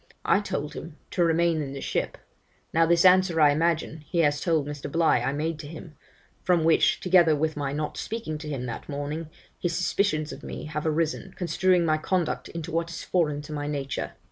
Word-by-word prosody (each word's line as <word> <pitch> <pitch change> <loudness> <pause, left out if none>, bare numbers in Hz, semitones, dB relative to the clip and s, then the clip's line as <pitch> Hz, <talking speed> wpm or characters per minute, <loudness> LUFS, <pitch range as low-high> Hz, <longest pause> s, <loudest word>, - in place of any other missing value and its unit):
I - - +4
told 150 -7 -4
him, 160 -2 -8
to 175 - +2
remain 165 -1 +2
in 135 -2 -5
the 140 - -6
ship. - - -2 0.6
Now 165 0 +4
this 170 +1 +4
answer, 185 -2 +5
I 150 -2 +7
imagine, 160 0 0
he 175 - -3
has 145 -2 +2
told 160 -5 +1
Mr, 145 -1 -6
Bligh 165 -6 +3
I 135 - 0
made 155 +2 -2
to 150 - -7
him; 160 0 -10 0.5
from 175 -3 +2
which, 160 0 +4
together 175 -4 +5
with 155 +1 -1
my 145 -2 -2
not 150 +1 -3
speaking 215 -9 -4
to 150 0 -7
him 135 -4 -3
that 120 +3 -6
morning, 150 +3 -4 0.3
his 175 -2 -1
suspicions 170 -3 0
of - - -10
me - - -7
have 150 +1 -3
arisen, 165 +4 -1
construing 180 0 +2
my 155 -1 +2
conduct 180 +1 -1
into 165 0 -6
what 165 +1 -1
is 170 - -6
foreign 150 -5 0
to 150 - -8
my 145 -1 -3
nature. 140 -2 -3
160 Hz, 205 wpm, -26 LUFS, 150-170 Hz, 0.6 s, I